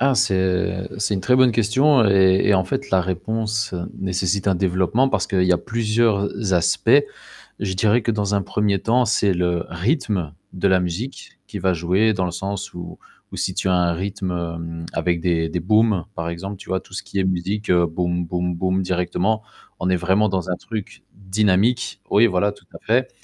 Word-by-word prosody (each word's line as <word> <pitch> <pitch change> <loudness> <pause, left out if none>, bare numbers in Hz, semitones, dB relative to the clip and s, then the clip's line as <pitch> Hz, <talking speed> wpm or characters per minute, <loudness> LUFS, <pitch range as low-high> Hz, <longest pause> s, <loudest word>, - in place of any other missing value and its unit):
Ah, 135 +1 +3
c'est 95 -2 0
c'est 105 0 0
une 95 - -2
très 125 - +2
bonne 130 -1 +5
question 120 +3 +3
et 95 -1 +4
et 105 - +4
en 95 - +3
fait, 135 +9 -4
la 95 - +4
réponse 105 +3 -2 0.2
nécessite 95 +1 -1
un 95 - +3
développement 95 +7 +1
parce - - 0
qu'il 95 -3 +1
y 90 - +2
a 90 - +2
plusieurs 110 -1 0
aspects. 85 -2 +3 0.5
Je 95 -2 -2
dirais 110 +5 +3
que 115 - 0
dans 105 -2 -1
un 100 - 0
1er 100 -1 0
temps, 125 +2 +2
c'est 105 -2 +2
le 90 -1 0
rythme 95 - -1 0.2
de 95 +1 0
la 95 -1 +4
musique 90 +9 -5
qui - - -6
va 95 - +1
jouer, 90 +6 +2
dans 95 -3 -1
le - - -3
sens 95 +3 -5
où 90 - -8 0.3
où - - -6
si - - -1
tu - - -2
as 90 - +3
un 90 -1 +2
rythme, 95 +1 -4
hem, 85 -1 -5
avec 85 0 0
des 80 -1 0
des 85 +2 -3
booms 105 -1 +2
par 85 -2 -4
exemple, 95 +4 -6
tu - - -13
vois? 95 - 0
Tout - - -16
ce - - -4
qui 100 - -5
est 95 - +2
musique 95 +4 -2
boom 85 0 0
boom 90 +1 -2
boom 95 +2 0
directement, 90 +4 -1 0.4
on 90 - 0
est 90 - +3
vraiment 95 +5 +2
dans 95 -3 -2
un 90 - 0
truc 110 -2 -7
dynamique. 100 +4 +1
Oui, 110 +3 +5
voilà 100 0 +1
tout 100 - -19
à - - -8
fait, 125 +4 +2
95 Hz, 200 wpm, -21 LUFS, 90-105 Hz, 0.5 s, bonne